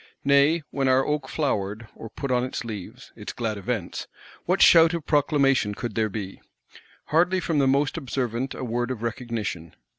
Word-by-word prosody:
Nay, 140 Hz, +4 st, +4 dB
when 135 Hz, -1 st, 0 dB
our 130 Hz, +1 st, +4 dB
oak 150 Hz, -3 st, -2 dB
flowered, 110 Hz, -7 st, -2 dB
or 115 Hz, -, -9 dB
put 135 Hz, +4 st, -5 dB
on 125 Hz, -1 st, +2 dB
its 125 Hz, -1 st, -4 dB
leaves 105 Hz, -5 st, -8 dB
(its -, -, -7 dB
glad 115 Hz, -3 st, -2 dB
Events), 105 Hz, -3 st, -4 dB, 0.4 s
what -, -, +1 dB
shout 165 Hz, 0 st, +7 dB
of 165 Hz, -3 st, -5 dB
proclamation 140 Hz, -7 st, +2 dB
could 120 Hz, 0 st, -5 dB
there 110 Hz, 0 st, 0 dB
be? 95 Hz, -2 st, -6 dB, 0.7 s
Hardly 180 Hz, +3 st, +3 dB
from 165 Hz, -4 st, 0 dB
the 135 Hz, -, +3 dB
most 140 Hz, +3 st, +1 dB
observant 130 Hz, -3 st, -3 dB
a -, -, -6 dB
word 120 Hz, 0 st, -2 dB
of 120 Hz, -3 st, -4 dB
recognition. 115 Hz, -, -4 dB
130 Hz, 175 wpm, -25 LUFS, 110-140 Hz, 0.7 s, shout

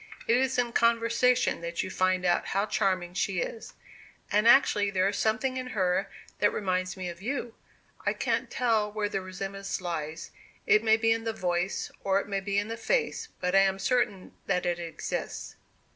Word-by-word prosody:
It 230 Hz, -, +4 dB
is 260 Hz, 0 st, +1 dB
in 240 Hz, -1 st, 0 dB
conversation 235 Hz, 0 st, +2 dB
that 170 Hz, 0 st, -3 dB
you 185 Hz, -, -6 dB
find 185 Hz, 0 st, +1 dB
out 175 Hz, -, +2 dB
how 200 Hz, -, +2 dB
charming 185 Hz, -4 st, 0 dB
she 185 Hz, -, -1 dB
is. -, -, -5 dB, 0.6 s
And 210 Hz, +2 st, +3 dB
actually 210 Hz, -5 st, +5 dB
there 190 Hz, -1 st, +2 dB
is 200 Hz, -, -1 dB
something 225 Hz, +5 st, 0 dB
in 255 Hz, 0 st, -4 dB
her 185 Hz, +1 st, +1 dB, 0.3 s
that 205 Hz, -, +4 dB
reminds 185 Hz, -2 st, -1 dB
me 185 Hz, -1 st, -4 dB
of 170 Hz, +1 st, -7 dB
you! 245 Hz, 0 st, -3 dB, 0.5 s
I -, -, +1 dB
can't -, -, -1 dB
tell 225 Hz, -4 st, +1 dB
where 210 Hz, -1 st, -1 dB
the 195 Hz, -, -2 dB
resemblance 195 Hz, +1 st, -5 dB
lies 165 Hz, -3 st, -5 dB, 0.3 s
it 215 Hz, +1 st, +4 dB
may 220 Hz, 0 st, +5 dB
be 225 Hz, 0 st, +2 dB
in 225 Hz, 0 st, +1 dB
the 225 Hz, -1 st, -2 dB
voice, 180 Hz, -3 st, -1 dB
or 195 Hz, 0 st, +2 dB
it -, -, -6 dB
may 200 Hz, -1 st, -1 dB
be 200 Hz, +1 st, -2 dB
in 205 Hz, +1 st, +1 dB
the 230 Hz, +1 st, -5 dB
face, 460 Hz, -, 0 dB
but 180 Hz, 0 st, -1 dB
I 195 Hz, -, +7 dB
am 195 Hz, 0 st, +3 dB
certain 200 Hz, -3 st, 0 dB, 0.2 s
that 180 Hz, -, 0 dB
it 175 Hz, -1 st, 0 dB
exists." 165 Hz, -2 st, -5 dB
200 Hz, 190 wpm, -28 LUFS, 185-230 Hz, 0.6 s, I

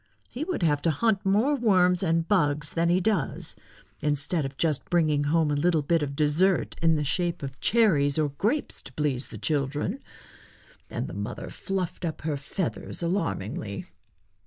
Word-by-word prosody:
He 260 Hz, -, -5 dB
would 355 Hz, -, -2 dB
have 145 Hz, -3 st, +2 dB
to 165 Hz, -, +2 dB
hunt 200 Hz, +6 st, +1 dB
more 210 Hz, +9 st, +3 dB
worms 185 Hz, -8 st, +3 dB
and 165 Hz, -2 st, +1 dB
bugs 150 Hz, -6 st, +1 dB
than 170 Hz, 0 st, +1 dB
he 175 Hz, +2 st, +4 dB
does, 190 Hz, -6 st, -1 dB, 0.5 s
instead 145 Hz, +2 st, 0 dB
of 135 Hz, 0 st, -6 dB
just 155 Hz, -4 st, 0 dB
bringing 155 Hz, -4 st, +2 dB
home 155 Hz, 0 st, +2 dB
a -, -, +1 dB
little 160 Hz, +1 st, +2 dB
bit 165 Hz, +2 st, +2 dB
of 140 Hz, -1 st, -3 dB
dessert 160 Hz, +5 st, +2 dB
in 165 Hz, -1 st, +4 dB
the 150 Hz, -, 0 dB
shape 175 Hz, +2 st, -1 dB
of 135 Hz, -1 st, -6 dB
cherries 160 Hz, -12 st, +3 dB
or 155 Hz, -2 st, +2 dB
grapes 215 Hz, -, -1 dB
to -, -, -12 dB
please 140 Hz, -4 st, -1 dB
the -, -, -9 dB
children;" 150 Hz, -, -1 dB, 0.9 s
and -, -, -3 dB
the -, -, -8 dB
mother -, -, -5 dB
fluffed 190 Hz, -2 st, -4 dB
up 160 Hz, -3 st, -3 dB
her 155 Hz, -2 st, -1 dB
feathers 160 Hz, +5 st, -3 dB
alarmingly. 110 Hz, -, -2 dB
165 Hz, 170 wpm, -27 LUFS, 145-185 Hz, 0.9 s, he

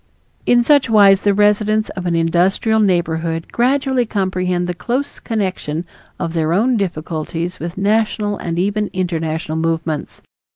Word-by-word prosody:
In 240 Hz, 0 st, +5 dB
such 285 Hz, -1 st, +3 dB
wise 200 Hz, -3 st, +6 dB
the 205 Hz, -, +4 dB
residents 210 Hz, +1 st, +2 dB
of 180 Hz, -1 st, -5 dB
an 170 Hz, -, +1 dB
industrial 180 Hz, +7 st, +2 dB
neighborhood 165 Hz, -4 st, 0 dB
gradually 265 Hz, +1 st, +1 dB
comprehend 185 Hz, -3 st, -1 dB
the 180 Hz, -, -2 dB
close 250 Hz, +10 st, -3 dB
connection 185 Hz, -7 st, -3 dB, 0.3 s
of 165 Hz, -, -3 dB
their 160 Hz, -1 st, 0 dB
own 235 Hz, +7 st, +2 dB
difficulties 170 Hz, -2 st, -3 dB
with 170 Hz, +3 st, -6 dB
national 210 Hz, 0 st, 0 dB
and 170 Hz, -1 st, -4 dB
even 205 Hz, +3 st, 0 dB
international 160 Hz, -3 st, -2 dB
movements. 160 Hz, -2 st, -3 dB
185 Hz, 135 wpm, -18 LUFS, 165-215 Hz, 0.3 s, wise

